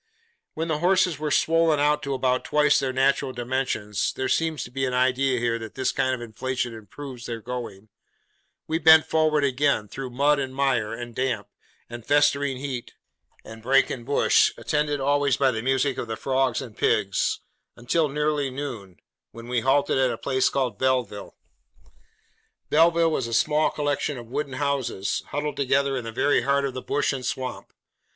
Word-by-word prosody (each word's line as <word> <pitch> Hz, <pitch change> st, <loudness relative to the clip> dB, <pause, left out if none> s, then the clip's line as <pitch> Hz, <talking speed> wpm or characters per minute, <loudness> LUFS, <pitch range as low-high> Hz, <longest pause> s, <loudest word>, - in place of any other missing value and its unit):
When 160 Hz, +1 st, -2 dB
the 155 Hz, -2 st, -1 dB
horses 180 Hz, -2 st, +2 dB
were 155 Hz, 0 st, -2 dB
swollen 165 Hz, -1 st, +3 dB
out 150 Hz, +1 st, +2 dB
to 140 Hz, -2 st, -3 dB
about 130 Hz, -1 st, 0 dB
twice 150 Hz, -1 st, +3 dB
their 135 Hz, -1 st, -1 dB
natural 135 Hz, 0 st, +1 dB
dimensions 120 Hz, -5 st, -2 dB
(there 130 Hz, -, -2 dB
seems 160 Hz, -2 st, 0 dB
to 120 Hz, -, -10 dB
be 135 Hz, +1 st, -3 dB
an 125 Hz, -1 st, -2 dB
idea 130 Hz, +1 st, +2 dB
here, 115 Hz, -1 st, 0 dB
that 110 Hz, -2 st, -9 dB
this 130 Hz, -, 0 dB
kind 130 Hz, 0 st, 0 dB
of 120 Hz, -, -10 dB
inflation 120 Hz, +1 st, -3 dB
improves 120 Hz, +4 st, -9 dB
their 115 Hz, -1 st, -4 dB
going), 115 Hz, -4 st, -7 dB, 0.8 s
we 160 Hz, +1 st, -1 dB
went 160 Hz, -1 st, +7 dB
forward 155 Hz, -2 st, +2 dB
again, 140 Hz, -5 st, +1 dB
through 130 Hz, +5 st, -6 dB
mud 140 Hz, +4 st, +2 dB
and 130 Hz, -1 st, -4 dB
mire, 130 Hz, -6 st, +1 dB
and 120 Hz, +1 st, -7 dB
damp, 120 Hz, -5 st, -2 dB, 0.4 s
and 120 Hz, -1 st, -9 dB
festering 145 Hz, 0 st, +2 dB
heat, 130 Hz, -3 st, -6 dB, 0.5 s
and 110 Hz, 0 st, -11 dB
brake 135 Hz, +4 st, +3 dB
and 120 Hz, -, -5 dB
bush, 140 Hz, +4 st, +3 dB
attended 150 Hz, -1 st, -1 dB
always 140 Hz, -1 st, +2 dB
by 135 Hz, -2 st, +3 dB
the 110 Hz, -2 st, -3 dB
music 135 Hz, +2 st, 0 dB
of -, -, -4 dB
the 110 Hz, 0 st, -4 dB
frogs 130 Hz, 0 st, 0 dB
and 115 Hz, -5 st, -11 dB
pigs, 100 Hz, -1 st, +1 dB, 0.4 s
until 145 Hz, +6 st, 0 dB
nearly 150 Hz, -1 st, 0 dB
noon, 125 Hz, -9 st, -7 dB, 0.3 s
when 115 Hz, 0 st, -11 dB
we 125 Hz, -1 st, 0 dB
halted 135 Hz, +3 st, +2 dB
at 130 Hz, -1 st, +3 dB
a 120 Hz, -, -3 dB
place 130 Hz, +2 st, +1 dB
called 125 Hz, -7 st, -2 dB
Belleville. 125 Hz, -6 st, -1 dB, 1.4 s
Belleville 165 Hz, +1 st, +4 dB
was 130 Hz, -6 st, -1 dB
a 115 Hz, -, -5 dB
small 155 Hz, +4 st, +2 dB
collection 145 Hz, -1 st, -2 dB
of 120 Hz, -, -8 dB
wooden 140 Hz, -1 st, -3 dB
houses, 135 Hz, -8 st, -1 dB
huddled 145 Hz, +1 st, -3 dB
together 140 Hz, 0 st, +1 dB
in 125 Hz, -3 st, -4 dB
the 115 Hz, -, -5 dB
very 140 Hz, +5 st, +2 dB
heart 140 Hz, +2 st, +1 dB
of 135 Hz, -, -3 dB
the 130 Hz, -, -5 dB
bush 145 Hz, -, 0 dB
and 130 Hz, -2 st, -5 dB
swamp. 125 Hz, +1 st, -4 dB
135 Hz, 180 wpm, -25 LUFS, 120-145 Hz, 1.4 s, went